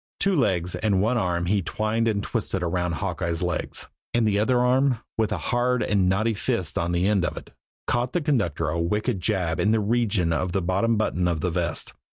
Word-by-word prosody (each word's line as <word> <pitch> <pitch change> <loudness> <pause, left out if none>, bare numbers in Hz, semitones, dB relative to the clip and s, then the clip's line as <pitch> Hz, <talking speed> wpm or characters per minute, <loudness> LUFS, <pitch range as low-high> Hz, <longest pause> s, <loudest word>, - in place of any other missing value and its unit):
Two 195 -1 +2
legs 95 - +1
and 100 -3 +1
one 110 +6 +2
arm 85 -3 0
he 100 +3 +1
twined 110 +5 -1
and 100 -2 0
twisted 100 -5 -2
around 90 0 -1
Hawkeye's 85 -2 -2
legs; 90 -1 -3 0.3
and 115 -2 +3
the 100 -1 +2
other 120 +3 +2
arm, 130 +1 +3 0.2
with 110 -1 0
a 105 - 0
hard 120 +7 0
and 95 -3 +2
knotty 110 +4 +1
fist 100 - -2
on 85 +1 0
the 90 +2 +1
end 100 -3 +2
of 85 - -2
it, - - -9 0.3
caught 120 +1 0
the 175 - +2
conductor 105 - 0
a 85 +2 -1
wicked 105 +4 -1
jab 90 -5 0
in 105 - +2
the 110 0 +3
region 105 -5 +1
of 90 +2 -1
the 95 - +1
bottom 100 +6 +1
button 90 -4 0
of 85 -3 -1
the 90 - 0
vest. 85 -1 -1
100 Hz, 210 wpm, -25 LUFS, 90-115 Hz, 0.3 s, and